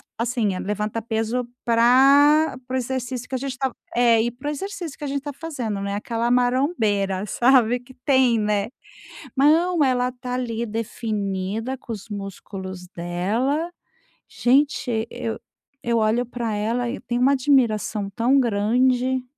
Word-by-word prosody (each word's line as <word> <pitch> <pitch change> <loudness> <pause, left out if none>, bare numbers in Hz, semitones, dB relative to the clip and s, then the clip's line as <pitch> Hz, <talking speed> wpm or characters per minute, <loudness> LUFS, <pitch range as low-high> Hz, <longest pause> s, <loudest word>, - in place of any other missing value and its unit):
assim, 230 -4 0
eh, 185 - -4
levanta 210 +3 -2
peso 225 +2 -1 0.2
pra 275 +6 +5
para 255 - -3
o - - +2
exercício 255 0 -3
que - - -12
a 260 - +1
gente 270 -1 -4
tá 265 -1 -1 0.2
é, 235 -2 +4
e 235 - 0
para 250 +5 -6
o - - -1
exercício 345 -1 -5
que - - -11
a - - -2
gente 280 0 -2
tá 290 0 -6
fazendo 255 -10 -4
né, 200 0 -2
aquela 230 +3 -2
marombeira, 240 - +1
sabe, 245 +1 +3
que 250 +1 -17
tem, 260 -4 +4
né. 210 -1 0 0.7
Não, 320 +4 +4
ela 250 -2 +2
está 250 0 -6
ali, 235 -2 -2
definida 215 +1 -3
com 245 - -10
os 215 -2 -6
músculos 195 -2 -7
dela. 205 - -1 0.6
Gente, 245 -3 +1
eu 225 - -4 0.5
eu 235 -1 +1
olho 225 +3 +1
pra 235 -2 -3
ela 230 +4 -1
e - - -4
eu - - -11
tenho 240 0 -2
uma 270 - +5
admiração 235 -7 +1
tão 245 +7 +3
grande. 250 +3 +1
240 Hz, 160 wpm, -23 LUFS, 215-260 Hz, 0.7 s, pra